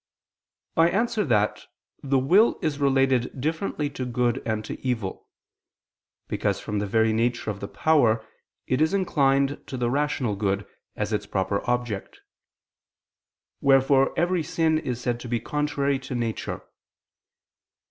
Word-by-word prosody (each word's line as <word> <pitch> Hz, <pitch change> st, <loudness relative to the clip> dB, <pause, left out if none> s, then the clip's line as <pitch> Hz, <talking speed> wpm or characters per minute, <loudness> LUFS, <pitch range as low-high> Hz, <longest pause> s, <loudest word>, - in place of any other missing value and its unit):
I 165 Hz, +1 st, +5 dB
answer 220 Hz, +3 st, +1 dB
that, 105 Hz, -5 st, +1 dB, 0.3 s
The 135 Hz, -1 st, +1 dB
will 180 Hz, -, +4 dB
is 150 Hz, -3 st, -1 dB
related 135 Hz, -2 st, +2 dB
differently 155 Hz, +1 st, -1 dB
to 130 Hz, -, -5 dB
good 125 Hz, 0 st, 0 dB
and 110 Hz, -1 st, -1 dB
to -, -, -7 dB
evil. 115 Hz, -7 st, -3 dB, 1.0 s
Because -, -, -1 dB
from 105 Hz, 0 st, -3 dB
the 105 Hz, -, -2 dB
very 110 Hz, +1 st, +2 dB
nature 115 Hz, 0 st, 0 dB
of 100 Hz, -, -8 dB
the 100 Hz, -, -5 dB
power, 115 Hz, -9 st, +2 dB, 0.4 s
it 130 Hz, +3 st, 0 dB
is 160 Hz, +5 st, +3 dB
inclined 140 Hz, -6 st, +2 dB
to 130 Hz, -, -5 dB
the 120 Hz, -1 st, 0 dB
rational 140 Hz, -6 st, 0 dB
good, 100 Hz, 0 st, -1 dB, 0.3 s
as 105 Hz, +1 st, -2 dB
its 105 Hz, -, -2 dB
proper 100 Hz, +1 st, -1 dB
object; 120 Hz, -5 st, -2 dB, 1.4 s
wherefore 135 Hz, 0 st, +4 dB
every 175 Hz, 0 st, +2 dB
sin 160 Hz, 0 st, +1 dB
is 125 Hz, -6 st, -4 dB
said 120 Hz, -1 st, -2 dB
to 125 Hz, -, -8 dB
be 120 Hz, -1 st, 0 dB
contrary 140 Hz, +1 st, -1 dB
to 130 Hz, -1 st, -6 dB
nature. 115 Hz, -2 st, -3 dB
130 Hz, 140 wpm, -25 LUFS, 115-145 Hz, 1.4 s, I